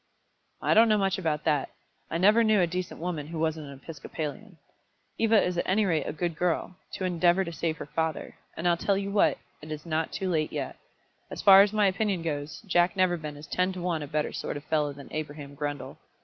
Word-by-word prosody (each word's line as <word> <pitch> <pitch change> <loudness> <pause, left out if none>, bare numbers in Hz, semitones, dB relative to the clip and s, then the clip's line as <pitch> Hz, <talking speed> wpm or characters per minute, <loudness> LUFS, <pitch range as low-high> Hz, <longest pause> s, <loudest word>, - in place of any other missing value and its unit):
"I - - +3
don't 225 +1 +6
know 215 - +4
much 195 -1 +1
about 155 -4 -1
that. 150 -3 +1 0.4
I - - -1
never 210 +6 +5
knew 215 -2 +4
a 180 - +4
decent 180 +1 -4
woman 165 -4 -3
who 165 +1 -6
wasn't 160 -1 -1
an 140 - -8
Episcopalian. 165 +5 -6 0.6
Eva 225 -1 +5
is 180 -1 -1
at - - -2
any 205 +3 +3
rate 160 -6 +1
a - - -1
good 165 +2 -2
girl, 180 +2 -1 0.2
to 190 - -3
endeavour 175 +1 +3
to 170 -2 -6
save 165 -1 -2
her - - -6
father; 160 +1 -2 0.2
and 165 +2 -1
I'll 175 - +4
tell 195 +3 +1
you 200 0 -3
what 205 - +3 0.2
it 155 +1 -9
is 155 +1 -6
not 160 -1 -1
too 190 - -3
late 155 -4 0
yet. - - -4 0.5
As - - -6
far 195 -1 +10
as 200 0 +3
my 215 -1 +2
opinion 195 -2 0
goes, 145 -2 -4
Jack 175 0 +2
Neverbend 175 -6 0
is 150 - -10
ten 180 +5 0
to 185 - -6
one 170 -3 -1
a 145 - -5
better 150 +1 -1
sort - - -4
of 145 - -9
fellow 150 -1 0
than 140 0 -11
Abraham 145 -2 -6
Grundle. 145 -1 -5
170 Hz, 225 wpm, -28 LUFS, 155-190 Hz, 0.6 s, far